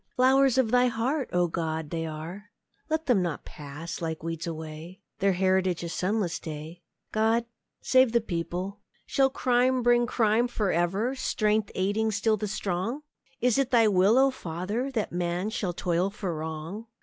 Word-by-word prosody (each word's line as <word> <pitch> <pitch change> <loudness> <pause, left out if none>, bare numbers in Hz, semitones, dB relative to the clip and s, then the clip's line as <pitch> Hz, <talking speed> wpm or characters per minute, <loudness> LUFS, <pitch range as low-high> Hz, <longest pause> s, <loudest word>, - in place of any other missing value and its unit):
Flowers 265 0 +4
of 245 -4 +3
Thy 250 0 +5
heart, 250 +4 -1
O 175 0 +2
God, 160 -1 -2
are - - -14
they! 165 +3 -5 0.5
Let 315 +1 0
them 245 -8 +3
not 170 -4 -3
pass, 150 +4 -7
like 160 -1 -3
weeds, 165 0 -4
away! 160 +2 -7 0.2
Their 195 -1 +3
heritage 185 -1 +1
a 170 - -4
sunless 185 0 -1
day! 160 +2 -8 0.3
God 225 +2 +2 0.4
save 260 -2 +4
the 235 - +4
people! 180 0 -4 0.3
Shall 270 -1 +3
crime 255 -1 +2
bring 240 0 +4
crime 230 +1 +2
for 215 -5 -1
ever, 190 +9 +1
Strength 215 -5 0
aiding 205 +4 +1
still 215 +1 +1
the 210 0 -3
strong? 205 +7 -2 0.4
Is 250 +1 +3
it 270 -2 +1
Thy 235 -3 +5
will, 200 +3 +4
O 270 +1 +5
Father! 200 +6 -3
That 230 -6 -2
man 175 +3 -1
shall 200 -4 -2
toil 175 +2 0
for 195 -4 -4
wrong? 160 +7 -6
200 Hz, 165 wpm, -27 LUFS, 170-240 Hz, 0.5 s, Thy